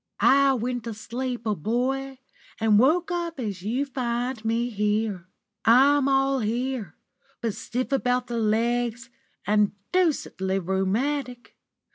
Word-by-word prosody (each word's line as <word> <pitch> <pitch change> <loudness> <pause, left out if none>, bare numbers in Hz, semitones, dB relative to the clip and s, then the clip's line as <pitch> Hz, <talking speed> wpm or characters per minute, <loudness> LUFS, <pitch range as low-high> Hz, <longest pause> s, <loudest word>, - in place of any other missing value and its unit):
I 275 0 +5
went 245 -1 -3
to 230 -2 -5
sleep 240 +2 -5
a 215 - +1
boy 255 - -2 0.4
and 220 -2 +4
woke 330 +8 +3 0.3
as 205 -8 -4
you 240 +8 -1
find 245 -2 -3
me. 220 -2 0 0.5
I'm 270 +5 +5
all 270 0 +2
here, 235 -3 -2 0.4
but 230 -3 -2
stiff 255 +6 -4
about 250 -2 +1
the 235 -1 -3
legs, 235 +2 0 0.3
and 210 0 +2 0.2
deucedly 285 - +1
rheumatic. 235 - -2
240 Hz, 115 wpm, -25 LUFS, 215-265 Hz, 0.5 s, I